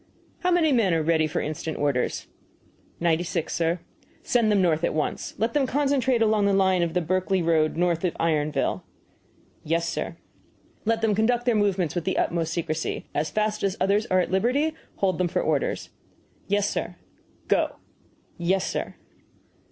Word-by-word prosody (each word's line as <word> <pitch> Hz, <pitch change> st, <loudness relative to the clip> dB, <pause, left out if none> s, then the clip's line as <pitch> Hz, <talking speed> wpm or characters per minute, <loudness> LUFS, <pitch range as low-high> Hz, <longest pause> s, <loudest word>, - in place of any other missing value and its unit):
"How 360 Hz, -, 0 dB
many 345 Hz, -4 st, +3 dB
men 215 Hz, -9 st, +3 dB
are 160 Hz, -, +1 dB
ready 160 Hz, -1 st, +2 dB
for 150 Hz, -, -2 dB
instant 155 Hz, +1 st, -4 dB
orders?" 140 Hz, -4 st, 0 dB, 0.7 s
"Ninety 170 Hz, 0 st, +2 dB
six, 165 Hz, -2 st, -3 dB
sir." 170 Hz, +1 st, 0 dB, 0.4 s
"Send 235 Hz, -4 st, +2 dB
them 205 Hz, -, +3 dB
north 170 Hz, -3 st, +2 dB
at -, -, 0 dB
once. 155 Hz, -, -2 dB
Let 225 Hz, +1 st, 0 dB
them 280 Hz, -3 st, +2 dB
concentrate 265 Hz, -4 st, +2 dB
along 215 Hz, -2 st, +3 dB
the 200 Hz, -, +2 dB
line 190 Hz, -2 st, +3 dB
of 170 Hz, 0 st, -1 dB
the 180 Hz, -, +2 dB
Berkley 185 Hz, +2 st, 0 dB
road 160 Hz, -1 st, +2 dB
north 175 Hz, -1 st, +1 dB
of 180 Hz, -, 0 dB
Ironville." 150 Hz, -3 st, 0 dB, 0.8 s
"Yes, 165 Hz, +2 st, 0 dB
sir." -, -, -3 dB, 0.7 s
"Let 225 Hz, +1 st, +1 dB
them 220 Hz, -2 st, +3 dB
conduct 235 Hz, +3 st, +1 dB
their 245 Hz, -, +3 dB
movements 195 Hz, -6 st, +1 dB
with 175 Hz, -3 st, -3 dB
the -, -, 0 dB
utmost 165 Hz, -1 st, 0 dB
secrecy. 165 Hz, -1 st, -2 dB
As 155 Hz, +2 st, 0 dB
fast 215 Hz, 0 st, -1 dB
as 195 Hz, +1 st, 0 dB
others 205 Hz, +3 st, +2 dB
are 185 Hz, -, +3 dB
at 180 Hz, -, 0 dB
liberty, 255 Hz, +11 st, +1 dB, 0.2 s
hold 190 Hz, -2 st, 0 dB
them 180 Hz, -, +2 dB
for -, -, -1 dB
orders." -, -, -1 dB, 0.6 s
"Yes, 205 Hz, 0 st, +1 dB
sir." -, -, -3 dB, 0.5 s
"Go!" -, -, +1 dB, 0.6 s
"Yes, 185 Hz, +2 st, +1 dB
sir." -, -, -3 dB
185 Hz, 170 wpm, -25 LUFS, 165-220 Hz, 0.8 s, many